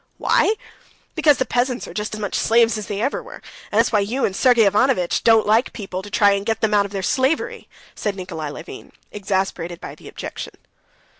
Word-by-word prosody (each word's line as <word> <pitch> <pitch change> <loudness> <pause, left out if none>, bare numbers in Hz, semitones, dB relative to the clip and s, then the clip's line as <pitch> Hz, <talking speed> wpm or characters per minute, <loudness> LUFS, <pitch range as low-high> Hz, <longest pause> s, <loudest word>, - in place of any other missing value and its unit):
"Why? 435 - +2 0.6
Because 295 -4 +4
the 260 - 0
peasants 245 +1 -1
are - - -9
just 210 0 -3
as - - -7
much 205 -2 -4
slaves 230 0 +3
as 215 -2 -5
they 205 0 -3
ever 270 - -1
were, - - -11 0.3
and - - -1
that's - - +3
why 215 - +3
you 230 +7 0
and 190 - -2
Sergey 245 -1 +4
Ivanovitch 205 -2 +2
don't 225 -1 +5
like 220 +4 +2
people 195 -4 -5
to 205 - -10
try 205 0 +4
and 200 0 0
get 225 +1 -2
them 215 -1 +1
out 200 -1 +3
of - - -19
their 195 -2 -4
slavery," 320 - 0 0.2
said 205 -2 -3
Nikolay 175 -5 -5
Levin, 145 - -10 0.2
exasperated 190 -4 -2
by - - -8
the - - -14
objection. - - -7
210 Hz, 210 wpm, -21 LUFS, 195-240 Hz, 0.6 s, don't